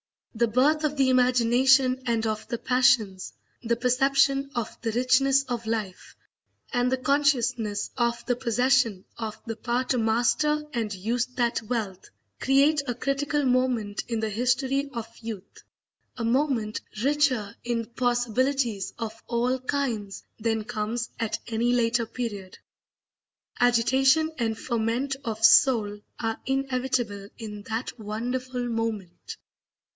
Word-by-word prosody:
The 235 0 +2
birth 280 +7 +2
of 300 -1 -1
the 270 -1 +3
imagination 255 +1 +4
and 230 -1 +1
of 215 0 -3
the 235 - -3
passions, 225 -7 +2 0.3
the 235 0 0
perception 275 +3 +2
of 230 -2 -3
the 225 - -1
richness 260 +3 +3
of 240 -4 -5
life, 215 -5 -4 0.6
and 245 0 +1
the 260 - +2
consciousness 250 -6 +1
of 235 -1 0
the 245 - +1
possession 240 -4 +1
of 220 -2 -5
the 225 -1 -5
power 240 +2 -1
to 255 -1 0
master 245 +7 +2
and 225 -4 -2
use 225 +6 -1
that 240 -2 0
wealth, 215 -5 -4 0.3
create 280 +3 +3
a 245 - -2
critical 285 +3 -1
moment 250 -5 0
in 230 -2 -2
the 220 - -1
history 260 +5 0
of 230 -2 -4
youth, 220 -4 -8 0.5
a 235 - -3
moment 235 -3 0 0.2
richer 270 -7 +1
in 235 -1 -1
possibilities 245 -2 0
of 225 -1 -6
all 245 +2 0
kinds 245 -8 -3 0.2
than 225 0 0
comes 235 +1 -3
at 225 -2 -1
any 235 +1 +1
later 235 -1 +1
period. 210 -6 -6 1.0
Agitation 265 +6 +3
and 225 -2 -1
ferment 240 +4 -1
of 225 -1 0
soul 220 -2 +5 0.2
are 225 -1 -2
inevitable 255 -6 -1
in 210 -3 -7
that 230 +2 -4
wonderful 245 +4 -3
moment. 225 -6 -4
240 Hz, 130 wpm, -26 LUFS, 225-260 Hz, 1.0 s, soul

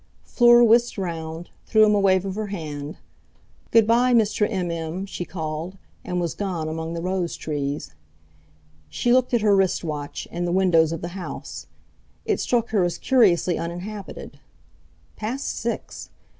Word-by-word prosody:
Fleur 240 -1 +6
whisked 235 +1 +4
round, 165 -2 -5 0.2
threw 220 -1 +5
him 210 - +3
a 205 - +3
wave 190 -1 +3
of 195 - -3
her 215 +1 -4
hand. 155 -6 -6 0.7
"Good 225 -2 +5
bye, 240 +3 +3
Mr. 210 -2 +2
M.M.!" 175 -2 -3
she 180 -2 -6
called, 160 +2 -5 0.3
and 180 - -2
was 170 -2 -2
gone 180 -6 -3
among 160 +1 -4
the 165 - -4
rose 185 -2 -1
trees. 145 - -4 1.0
She 240 - +1
looked 255 0 +3
at 235 - +2
her 205 -1 +4
wrist 190 -2 +1
watch 150 -3 -5
and 175 +1 -2
the - - -1
windows 175 -4 +3
of 165 - -4
the 175 - -4
house. 185 0 -7 0.6
It - - 0
struck 235 -1 0
her 210 -4 +2
as 175 -1 -1
curiously 185 -9 +3
uninhabited. 185 +4 -7 0.8
Past 240 +6 -3
six! - - -5
185 Hz, 155 wpm, -23 LUFS, 165-215 Hz, 1.0 s, Fleur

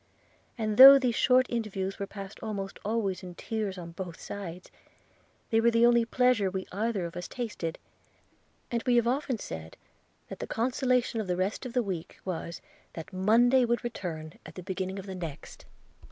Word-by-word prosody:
And 215 -2 -1
though 275 +1 +12
these 255 -3 +1
short 255 +2 +4
interviews 195 -5 -3
were 200 - -3
passed 195 0 -9
almost 200 -3 -5
always 205 -3 -1
in 180 -1 -9
tears 210 -1 -3
on 170 -2 -8
both 175 -1 -7
sides, 180 -3 -7 0.8
they 225 0 +4
were 235 - +5
the 230 0 +4
only 240 -1 +4
pleasure 245 -4 +2
we 190 0 -4
either 205 -1 -1
of 170 +1 -7
us 175 0 -5
tasted; 210 -9 -4 0.9
and 235 -1 0
we 245 - +4
have 235 -1 +4
often 260 0 0
said, 80 - -8 0.5
that - - -8
the - - -5
consolation 250 -1 0
of 205 - -6
the 180 -1 -1
rest 195 +7 -2
of 240 - -9
the 250 -1 +2
week 180 -5 -5
was, 170 -2 -5 0.3
that 165 +1 -9
Monday 235 +7 +4
would 240 0 0
return 165 -8 -6
at - - -12
the 185 - -8
beginning 190 +1 -4
of 195 - -7
the 190 - -6
next!' 165 -6 -8
205 Hz, 180 wpm, -29 LUFS, 185-235 Hz, 0.9 s, though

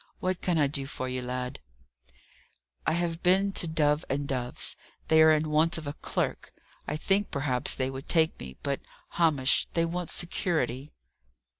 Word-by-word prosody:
What 185 -1 -1
can 175 -2 +1
I 150 - +4
do 140 -1 0
for 130 -2 -4
you, 130 0 -2
lad?" 125 0 -4 1.3
"I 155 - +3
have 170 0 -1
been 190 +2 +4
to 175 - 0
Dove 150 -1 +2
and 140 +1 -1
Dove's. 125 -3 -1 0.3
They 160 0 +6
are 160 0 +7
in 155 0 +1
want 160 +3 +3
of 160 - -7
a 145 - -3
clerk. - - -3 0.3
I 150 - -2
think 195 +5 +1
perhaps 135 -3 0
they 130 0 -1
would 135 +2 -8
take 160 -1 +3
me; 65 0 -8
but, 140 -1 -1 0.3
Hamish, 150 -6 +3
they 165 0 +2
want 175 0 -3
security." 155 -6 -1
155 Hz, 170 wpm, -28 LUFS, 135-170 Hz, 1.3 s, are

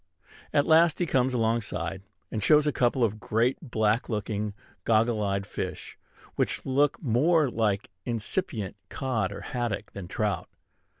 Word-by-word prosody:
At 145 - +3
last 165 0 +5
he 175 - +1
comes 130 -4 +2
alongside, 110 -7 -1 0.3
and 110 - -2
shows 150 +6 +5
a 150 - +2
couple 125 -1 +2
of 110 -1 0
great 115 +5 +1
black 110 -5 0
looking, 105 -1 -2 0.3
goggle 115 0 +2
eyed 100 -1 -1
fish, - - -5 0.4
which - - -1
look 140 +2 +2
more 145 +4 +3
like 105 -4 0
incipient 115 - -2
cod 115 -8 -1
or 100 - -7
haddock 120 -4 -3
than 95 -3 -7
trout. 100 -1 -2
115 Hz, 140 wpm, -27 LUFS, 105-130 Hz, 0.4 s, last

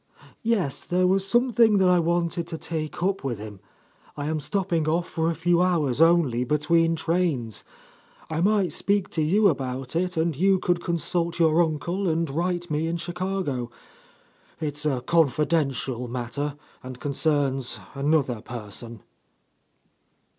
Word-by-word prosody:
"Yes, 205 - 0
there 180 +1 +1
was 190 +1 +2
something 235 -2 +4
that 190 -1 +4
I 180 -1 +5
wanted 170 0 0
to 160 - -5
take 160 +1 -4
up 195 -2 0
with 125 -4 -2
him. 105 -1 -9 0.6
I 145 - -3
am 155 0 -1
stopping 175 -1 -1
off 170 +3 +1
for 165 -1 -1
a 165 - -1
few 175 +1 +2
hours 160 -7 +1
only, 165 -8 +4
between 165 +4 +2
trains. 160 - -1 0.6
I 160 +1 -2
might 195 -4 +2
speak 200 -1 +1
to 160 - -1
you 200 +7 +4
about 130 -4 -2
it, 180 +1 -1
and 160 -1 +1
you 190 +5 +3
could 175 -1 0
consult 170 0 -1
your 165 0 +4
uncle 170 +4 -1
and 165 +1 0
write 175 +2 -2
me 155 +2 0
in 170 +1 -1
Chicago. 175 -7 -3 0.9
It's 150 -1 -2
a 130 -4 0
confidential 140 -4 +1
matter, 125 +4 -3 0.3
and 130 -1 -9
concerns 140 -2 0
another 140 -4 +1
person." 115 -1 -7
165 Hz, 145 wpm, -25 LUFS, 140-175 Hz, 0.9 s, I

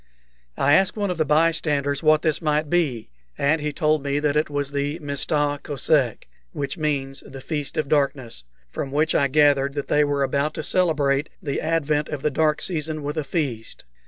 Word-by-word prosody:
I 140 +1 +3
asked 190 +5 +3
one 200 -3 0
of 175 - -5
the 155 - +2
bystanders 150 -2 +1
what 155 0 +4
this 155 -2 0
might 150 -1 0
be, 135 - 0 0.3
and 155 +3 +1
he 150 0 -2
told 155 +1 +1
me 140 0 -1
that 145 0 0
it 150 +1 +1
was 145 -1 -3
the 145 +2 -2
Mista 145 -1 -1
Kosek, 140 - 0 0.3
which 140 - -3
means 140 -4 -2
the 135 - -10
"Feast 145 +1 -4
of 155 -2 0
Darkness," 140 - -1 0.3
from 135 - -4
which 155 +3 +1
I 140 - +3
gathered 140 -1 +3
that 145 - -4
they 150 - +4
were 145 -1 0
about 140 +3 -1
to 155 - -4
celebrate 150 -5 +1
the 140 -2 -3
advent 155 -2 0
of 145 -3 -5
the 150 - +1
dark 155 +2 +1
season 155 -3 -3
with 145 +2 -3
a 155 - -1
feast. 135 -7 -4
145 Hz, 190 wpm, -23 LUFS, 140-155 Hz, 0.3 s, what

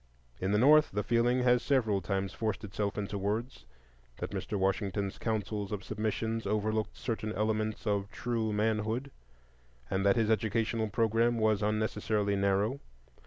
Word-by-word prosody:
In 95 +1 -1
the 105 - +3
North 150 +6 +6
the 105 +1 -2
feeling 120 +3 +2
has 125 -1 +4
several 110 -9 +1
times 95 +1 -2
forced 110 -2 -2
itself 100 +1 -3
into 100 0 -3
words, 105 - -3 0.5
that - - -5
Mr. 105 - -3
Washington's 100 0 -1
counsels 105 -2 -2
of 105 -2 -3
submission 110 +2 -2
overlooked 110 +1 -1
certain 110 -3 -3
elements 110 0 -1
of 100 -2 0
true 110 0 -2
manhood, 110 +5 0 0.8
and 95 0 +1
that 100 +1 +4
his 110 -2 +2
educational 110 +1 +1
programme 115 +2 +2
was 110 -2 +2
unnecessarily 105 -1 0
narrow. 100 +6 +1
110 Hz, 145 wpm, -31 LUFS, 100-115 Hz, 0.8 s, North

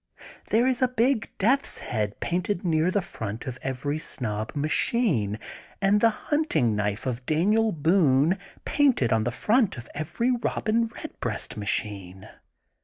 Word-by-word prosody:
There 230 +3 +3
is 255 -1 +1
a 255 - +5
big 245 -1 +1
death 255 +7 +3
's - - -5
head 105 -3 -3
painted 180 +2 -1
near 160 0 +2
the 195 0 0
front 110 -5 -6
of 125 -1 -6
every 140 +3 -2
Snob 110 -7 -3
machine, 145 - +1 0.4
and 200 +1 +3
the 230 - +6 0.2
hujiting 160 - +2
knife 105 0 -2
of 125 -1 -3
Daniel 210 +8 +2
Boone 160 0 +3 0.3
painted 260 - +3
on 110 -1 +1
the - - +1
front 215 - +2
of 120 -1 -9
every 160 - -1
Robin 230 -1 0
Bedbreast 140 - -5
machine. 100 -3 -2
160 Hz, 145 wpm, -26 LUFS, -, 0.4 s, the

